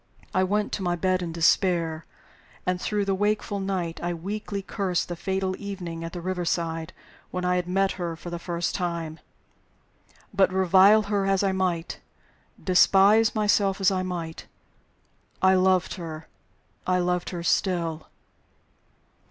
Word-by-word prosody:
I 185 - +3
went 205 +3 0
to - - -3
my 175 -2 0
bed 185 +1 0
in 170 -2 -4
despair; 165 -1 +1 0.6
and 180 0 -1
through 210 -1 -1
the 195 - +1
wakeful 205 +1 0
night 185 -4 -3
I 175 0 -2
weakly 200 +3 -5
cursed 185 -4 -2
the 175 - -3
fatal 190 +1 -2
evening 180 -5 -6
at 165 - -5
the 175 - -6
river 180 0 -2
side 165 -1 -2 0.4
when 180 0 -3
I 180 0 +2
had 180 -1 -2
met 195 +1 +1
her 170 -1 -2
for 170 +1 -9
the 170 - -4
first 170 0 -2
time. 170 -3 -3 1.1
But 190 -2 +3
revile 190 +3 +5
her 200 -1 0
as 195 0 +2
I 195 - +2
might, 180 -3 -2 0.6
despise 200 +4 +5
myself 205 -2 +2
as 195 0 +4
I 185 -1 0
might, 170 -3 -5 0.9
I 190 0 +5
loved 185 -1 +3
her 160 -3 -7 0.6
I 185 0 +3
loved 180 0 0
her 175 -2 -5
still! 170 -3 0
185 Hz, 150 wpm, -26 LUFS, 170-195 Hz, 1.1 s, revile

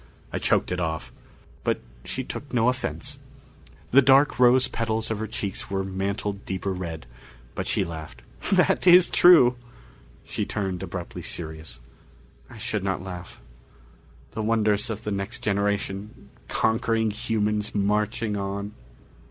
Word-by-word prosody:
I - - -1
choked - - +2
it 90 - -1
off. 80 -2 -3 0.5
But - - 0 0.2
she 130 - -4
took 140 +2 -7
no 120 -1 +3
offense. 130 0 -4 0.7
The 140 - +8
dark 135 +1 +5
rose 125 +1 +6
petals 110 -2 -2
of 110 - -2
her 110 - -3
cheeks 100 -3 -4
were 95 -1 -1
mantled 100 +1 -3
deeper 95 +1 -3
red, 85 -6 -5 0.5
but - - -4
she - - +1
laughed. 80 -7 -8 0.3
"That - - +3
is 180 0 +8
true." 130 -9 +7 0.7
She - - -3
turned 95 -4 -3
abruptly 90 -2 -6
serious. 80 -6 -6 0.7
"I - - -12
should 105 -3 -2
not 95 -2 -1
laugh. 90 -2 -8 0.9
The 110 - -4
wonders 105 -1 +1
of 110 -1 -4
the 105 - -3
next 100 0 -4
generation 100 0 -2 0.2
conquering 110 -1 +1
humans 105 -1 -1
marching 105 +1 0
on...." 100 +1 -4
105 Hz, 135 wpm, -25 LUFS, 95-115 Hz, 0.9 s, The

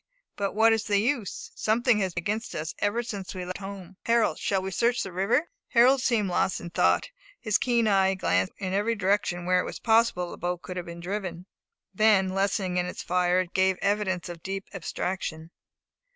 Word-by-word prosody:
But 200 -1 -2
what 225 +2 +5
is 225 - -1
the 205 -2 +2
use? 230 -1 -1
something 225 +1 +2
has 190 -3 -1
been 175 - -2
against 215 +5 -3
us 155 +1 -3
ever 215 +4 0
since 200 -5 -6
we 180 -1 -4
left 185 +2 -5
home. 195 -2 -8
Harold, 230 -1 +2
shall 195 - 0
we 190 +1 -4
search 240 +5 +1
the 190 - -6
river?" 195 - +1 0.2
Harold 255 +2 +5
seemed 230 -6 +1
lost 185 +1 0
in 170 - -8
thought. - - +2 0.3
His 215 -3 +1
keen 235 -3 +2
eye 195 -2 +4
had 190 -1 -2
glanced 90 - +1
in 190 -2 -3
every 210 +4 +1
direction, 185 -3 0
where 180 0 +3
it - - +1
was - - -6
possible 225 -6 +2
the - - -9
boat 175 0 -3
could 180 - -7
have 175 - -5
been 170 0 -8
driven; 180 -2 -4 0.5
then 210 -4 +4
lessening 190 -1 0
in 180 0 +1
its 180 - -6
fire, 180 0 +2
it 180 -1 -7
gave 190 0 +2
evidence 195 -3 0
of 170 -2 -8
deep 195 +2 -4
abstraction. 165 -3 -4
195 Hz, 205 wpm, -27 LUFS, 180-220 Hz, 0.5 s, what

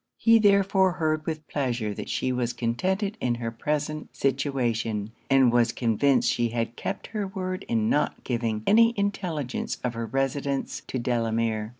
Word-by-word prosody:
He 230 0 +5
therefore 195 -2 +4
heard 155 -3 -1
with 155 -1 -4
pleasure 120 -7 -1
that - - -7
she 130 - -1
was 125 -1 -1
contented 185 - -1
in 120 -1 +1
her 115 -1 -4
present 150 +5 -3
situation; 120 -6 -1 0.2
and 135 -3 +5
was 120 -1 +4
convinced 125 +4 +2
she 120 -1 0
had 115 0 -2
kept - - -4
her 210 -2 -1
word 185 0 -4
in 110 -2 +1
not 145 - 0
giving 115 -3 -2
any 230 +2 +5
intelligence 180 -10 -2
of 125 -1 -1
her 115 0 -4
residence 135 +2 -1
to - - -3
Delamere. 115 -3 0
135 Hz, 160 wpm, -26 LUFS, 115-165 Hz, 0.2 s, He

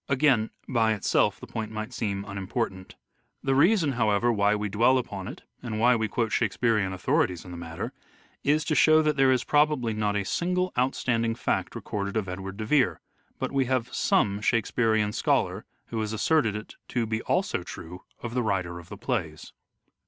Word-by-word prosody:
Again, 130 -5 +3 0.2
by 115 -4 +2
itself, 105 - +1
the - - -9
point 110 -1 -5
might 110 +3 -5
seem 100 -4 -2
unimportant. 100 0 -4 0.5
The 135 - +1
reason, 165 +2 +4
however, 115 -1 +2
why 105 0 +3
we 105 0 -2
dwell 115 +6 +3
upon 100 -7 -4
it, - - -9 0.2
and 110 -3 -4
why 120 +2 +5
we 110 -1 0
quote 115 +1 -1
Shakespearean 110 -3 +1
authorities 90 -1 0
in 90 - -9
the 85 - -7
matter, 80 -1 -6 0.5
is 150 +2 +2
to - - 0
show 155 +2 +5
that 150 -1 +1
there 135 -1 +4
is 130 -1 +2
probably 145 -6 +2
not 105 -1 0
a 100 -1 -1
single 180 - 0
outstanding 120 -2 0
fact - - -1
recorded 100 +1 -3
of 105 -3 -1
Edward 95 +2 -6
de 110 - -4
Vere, 135 +2 +2 0.4
but - - -3
we 135 -1 +1
have 125 -1 -1
some 100 0 +2
Shakespearean 110 -2 +1
scholar - - 0 0.2
who 115 -1 -2
has 110 0 -3
asserted 115 -1 +2
it 105 +1 -8
to 120 -2 -1
be 110 0 -2
also - - 0
true 90 +3 -9 0.2
of 120 -1 -4
the 125 - +1
writer 90 -5 -1
of 85 0 -14
the - - -8
plays. 75 -1 -3
110 Hz, 185 wpm, -27 LUFS, 100-130 Hz, 0.5 s, why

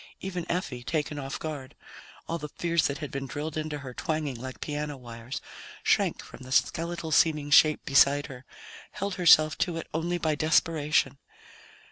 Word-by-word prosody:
Even 180 -3 -5
Effie 170 -8 -3
taken 150 +2 -2
off 135 -1 -4
guard, 145 -4 -6 0.5
all 170 - -2
the 150 - -6
fears 170 +1 +1
that 140 - -3
had 150 -3 -6
been 135 0 -4
drilled 150 +3 -5
into 155 -1 -3
her 135 -3 -8
twanging 155 0 -2
like 130 +2 -8
piano 150 -1 -4
wires 120 0 -7 0.4
shrank - - +2
from - - -12
the 130 0 -10
skeletal 170 +3 0
seeming 150 -2 +3
shape 155 0 +6
beside 140 +1 +5
her, 130 -1 -10 0.5
held 200 -1 -3
herself 155 -2 +6
to 175 -3 0
it 165 - -5
only 170 +3 -1
by 160 -2 0
desperation. 155 -1 +2
150 Hz, 165 wpm, -28 LUFS, 140-165 Hz, 0.5 s, shape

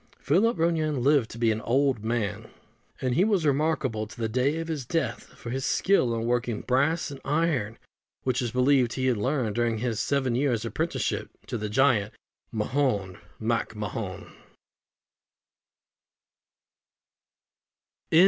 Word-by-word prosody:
Philip 190 +10 +2
Ronayne 155 -5 +1
lived 140 -4 +3
to - - -9
be 115 -1 +3
an 110 0 -2
old 130 -2 +1
man; 110 -2 -2 0.5
and 130 -2 0
he 175 - +4
was 200 -6 +2
remarkable 140 -7 +1
to 120 - -13
the 115 - 0
day 130 +7 +1
of 165 0 -4
his 155 -4 -3
death 130 -2 -2
for 115 - -7
his 135 +1 -2
skill 130 -12 +2
in 115 0 -2
working 120 -2 0
brass 145 +5 +1
and 135 -1 -9
iron, 145 -7 0 0.5
which 130 0 0
it - - -1
was 120 - -3
believed 125 -1 +3
he 130 - -1
had 125 -3 +2
learned 125 -1 0
during 120 -1 0
his 115 -1 -2
seven 135 -3 +1
years' 120 -3 +1
apprenticeship 115 - -2 0.2
to - - -5
the 105 -2 -3
giant 110 -3 +3 0.4
Mahon 105 -5 -1 0.2
MacMahon. 110 -3 -3
125 Hz, 140 wpm, -27 LUFS, 115-145 Hz, 0.5 s, he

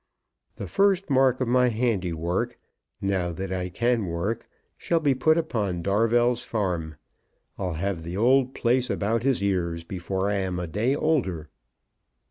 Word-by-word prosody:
The - - -6
first 195 -4 +2
mark 130 -1 +3
of 130 - +1
my 125 +1 +4
handiwork, 95 -8 -1 0.4
now 95 -3 0
that 95 +3 -5
I 90 -1 -2
can 115 +2 0
work, 85 +7 -3 0.3
shall 170 - 0
be 145 -4 +2
put 155 +5 +3
upon 105 - -1
Darvell's 115 +5 +2
farm. 90 -8 -2 0.6
I'll 90 -3 -2
have 90 +1 -2
the 85 +3 -5
old 130 +3 +3
place 125 +1 +1
about 110 +2 0
his 130 -5 +1
ears 85 -4 -1
before 95 +2 -3
I 100 0 0
am 95 -2 -2
a 90 - -3
day 110 - 0
older." 95 - -1
105 Hz, 150 wpm, -25 LUFS, 90-125 Hz, 0.6 s, my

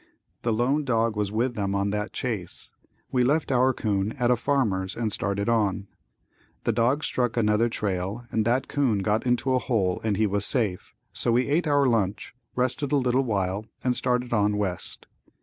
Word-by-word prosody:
The 120 - 0
lone 125 +7 +1
dog 115 -4 +1
was 105 -1 -1
with 120 +4 0
them 100 -3 -2
on 100 0 0
that 105 +1 -3
chase. 105 -9 -3 0.4
We 125 -1 +2
left 145 +4 +1
our 130 +1 +4
'coon 105 -3 -1
at 125 0 +1
a - - +5
farmer's 110 -8 0
and 115 -2 -2
started 100 0 -1
on. 105 -4 0 0.7
The - - +1
dogs 130 +6 +1
struck 120 -2 -1
another 110 +1 +2
trail 100 +2 -3
and 110 - +1
that 120 +4 +1
'coon 125 -9 0
got 105 +5 0
into 125 +2 +1
a 130 - +3
hole 100 -8 0
and 105 -3 0
he 110 - +3
was 100 0 +1
safe, 105 -6 +1 0.2
so 120 - +3
we 125 +2 +2
ate 155 +4 +1
our 145 -1 +3
lunch, 110 -6 0 0.2
rested 130 +2 -1
a - - +3
little 125 0 +2
while 100 -2 -2 0.2
and 125 -1 +1
started 125 -1 0
on 105 -1 +2
west. 95 -4 -3
115 Hz, 185 wpm, -26 LUFS, 100-125 Hz, 0.7 s, a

